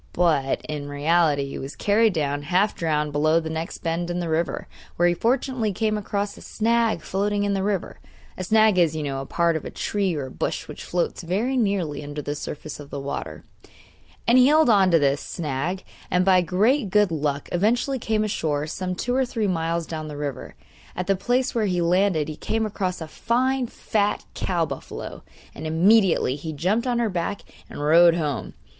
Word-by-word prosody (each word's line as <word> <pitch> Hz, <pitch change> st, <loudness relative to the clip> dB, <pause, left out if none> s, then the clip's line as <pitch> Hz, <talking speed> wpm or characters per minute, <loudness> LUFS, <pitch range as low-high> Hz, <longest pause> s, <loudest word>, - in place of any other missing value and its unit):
But, 155 Hz, -6 st, +1 dB
in 145 Hz, -2 st, -5 dB
reality, 145 Hz, 0 st, +2 dB
he 135 Hz, -, -6 dB
was 135 Hz, +2 st, -7 dB
carried 215 Hz, +1 st, +3 dB
down, 145 Hz, -3 st, -1 dB
half 185 Hz, +7 st, +1 dB
drowned, 150 Hz, -2 st, -1 dB
below 155 Hz, +3 st, +3 dB
the 160 Hz, -1 st, -5 dB
next 160 Hz, +1 st, -5 dB
bend 170 Hz, +1 st, -1 dB
in 175 Hz, 0 st, -2 dB
the 170 Hz, -2 st, -3 dB
river, 160 Hz, +2 st, -1 dB, 0.3 s
where 175 Hz, -, +3 dB
he 175 Hz, -, +3 dB
fortunately 235 Hz, +2 st, 0 dB
came 215 Hz, +2 st, 0 dB
across 205 Hz, 0 st, -2 dB
a -, -, -13 dB
'snag' 230 Hz, 0 st, 0 dB
floating 205 Hz, +1 st, 0 dB
in 200 Hz, 0 st, 0 dB
the 195 Hz, -, 0 dB
water 200 Hz, -3 st, -2 dB, 0.4 s
(a 185 Hz, -, -5 dB
snag 215 Hz, 0 st, +4 dB
is, 165 Hz, -3 st, +3 dB
you 155 Hz, -, -2 dB
know, 135 Hz, -2 st, -3 dB
a 135 Hz, -, -8 dB
part 170 Hz, -1 st, +1 dB
of 160 Hz, -, -3 dB
a -, -, -5 dB
tree 195 Hz, -4 st, -1 dB
or 135 Hz, -3 st, -4 dB
bush -, -, -3 dB
which -, -, -8 dB
floats 175 Hz, -1 st, -1 dB
very 205 Hz, +10 st, -1 dB
nearly 195 Hz, -, 0 dB
under 145 Hz, +1 st, -6 dB
the 145 Hz, 0 st, -3 dB
surface 150 Hz, 0 st, -7 dB
of 145 Hz, -1 st, -10 dB
the 140 Hz, -, -5 dB
water); 140 Hz, +1 st, -5 dB, 0.8 s
and 240 Hz, +2 st, +6 dB
he 255 Hz, -, +7 dB
held 305 Hz, -3 st, +5 dB
on 195 Hz, -3 st, +5 dB
to 170 Hz, -, +5 dB
this 140 Hz, -2 st, +2 dB
snag, 160 Hz, +4 st, -3 dB, 0.3 s
and 180 Hz, 0 st, +2 dB
by 185 Hz, -1 st, +5 dB
great 210 Hz, -, +2 dB
good 205 Hz, -1 st, +3 dB
luck 145 Hz, -3 st, -2 dB
eventually 240 Hz, +9 st, +1 dB
came 220 Hz, -1 st, 0 dB
ashore 155 Hz, -8 st, -1 dB
some 180 Hz, +3 st, -4 dB
two 245 Hz, +7 st, -2 dB
or 265 Hz, +1 st, +3 dB
three 230 Hz, -4 st, -2 dB
miles 165 Hz, -2 st, -1 dB
down 155 Hz, -1 st, -5 dB
the 150 Hz, -1 st, -7 dB
river. 145 Hz, -3 st, -5 dB, 0.4 s
At 180 Hz, -, -2 dB
the 195 Hz, +1 st, +2 dB
place 245 Hz, +6 st, 0 dB
where 220 Hz, -3 st, +1 dB
he 180 Hz, -2 st, 0 dB
landed 175 Hz, -2 st, +2 dB
he 155 Hz, -, -5 dB
came 220 Hz, +4 st, -1 dB
across 190 Hz, -4 st, -3 dB
a 160 Hz, -, -5 dB
fine 255 Hz, +8 st, 0 dB
fat 210 Hz, -2 st, -1 dB
cow 175 Hz, -3 st, 0 dB
buffalo, -, -, -7 dB, 0.3 s
and 160 Hz, -, -6 dB
immediately 175 Hz, -, +3 dB
he 160 Hz, +1 st, -6 dB
jumped 195 Hz, -, 0 dB
on 245 Hz, -1 st, +1 dB
her 235 Hz, -2 st, +1 dB
back 180 Hz, +3 st, -2 dB, 0.3 s
and 145 Hz, -, -6 dB
rode 170 Hz, +3 st, +6 dB
home. 150 Hz, -5 st, -3 dB
180 Hz, 200 wpm, -24 LUFS, 155-210 Hz, 0.8 s, he